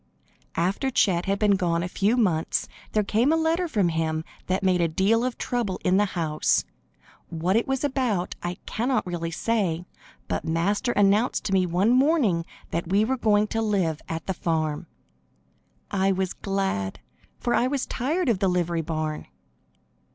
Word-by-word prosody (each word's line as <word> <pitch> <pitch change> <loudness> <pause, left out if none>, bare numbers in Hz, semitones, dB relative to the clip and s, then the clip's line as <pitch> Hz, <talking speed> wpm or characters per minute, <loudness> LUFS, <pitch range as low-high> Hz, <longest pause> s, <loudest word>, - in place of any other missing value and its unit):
After 185 +10 0
Chet 185 -8 +2
had 195 0 +1
been 210 0 +3
gone 170 -2 0
a - - -2
few 205 +6 +1
months 175 -9 +1 0.3
there 215 - +3
came 225 +8 +2
a - - +4
letter 325 +2 +1
from 205 - +1
him 160 -1 -1 0.2
that 185 +1 0
made 185 -2 +3
a 170 - +3
deal 195 +8 +2
of 250 -2 -2
trouble 235 -7 -2
in 185 +1 +4
the 205 - +4
house. 155 -2 +1 0.6
What 170 +3 0
it 230 - +2
was 270 0 -1
about 255 -10 0
I 175 +1 -3
cannot 245 +2 0
really 170 -2 -3
say, 180 -3 -1 0.4
but - - -2
Master 200 +9 0
announced 205 +4 +2
to 195 - -2
me 185 -1 +3
one 180 +6 +2
morning 255 - +3 0.2
that 170 0 -2
we 200 +3 +3
were 260 +3 0
going 210 -4 +3
to 225 - -1
live 190 -8 0
at 165 0 -4
the 190 - -1
farm. 160 -1 -2 1.0
I 195 -1 +2
was 190 -1 -1
glad, 195 - -2 0.4
for 240 - -1
I 245 - +3
was 275 0 -1
tired 315 +9 -1
of 225 -6 +2
the 195 - +2
livery 175 -2 0
barn. 155 -1 -3
195 Hz, 175 wpm, -25 LUFS, 170-230 Hz, 1.0 s, a